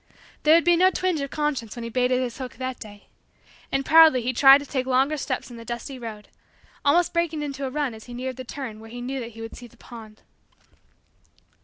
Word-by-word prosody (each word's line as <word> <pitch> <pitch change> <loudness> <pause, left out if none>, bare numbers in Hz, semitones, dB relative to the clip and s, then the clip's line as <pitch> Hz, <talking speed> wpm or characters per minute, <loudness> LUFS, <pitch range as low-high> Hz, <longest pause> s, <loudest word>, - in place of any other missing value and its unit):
There 310 +1 +6
would 335 - +4
be 345 0 +4
no 365 +2 +5
twinge 365 -4 -1
of 275 - -4
conscience 280 -8 -2
when 240 - -6
he 230 - -5
baited 250 +1 +1
his 250 -1 -4
hook 255 -1 -6
that 260 -1 -5
day. 205 -1 -12 0.6
And 270 0 0
proudly 315 -6 +6
he 255 +2 -1
tried 270 +2 +8
to 285 - -8
take 260 -2 -3
longer 265 +4 +2
steps 275 - -4
in 235 - -10
the 230 - -9
dusty 240 +3 -6
road; 220 -3 -8 0.6
almost 335 +5 +3
breaking 335 -3 -1
into 275 -1 -4
a - - -4
run 285 -2 -2
as 220 0 -12
he 245 - -9
neared 255 +1 -5
the 255 - -6
turn 245 -4 -7
where 225 0 -12
he 245 +2 -8
knew 260 +2 -4
that 235 -2 -7
he 225 - -10
would 225 - -8
see 245 - -11
the - - -23
pond. 220 -3 -13
255 Hz, 230 wpm, -24 LUFS, 235-290 Hz, 0.6 s, tried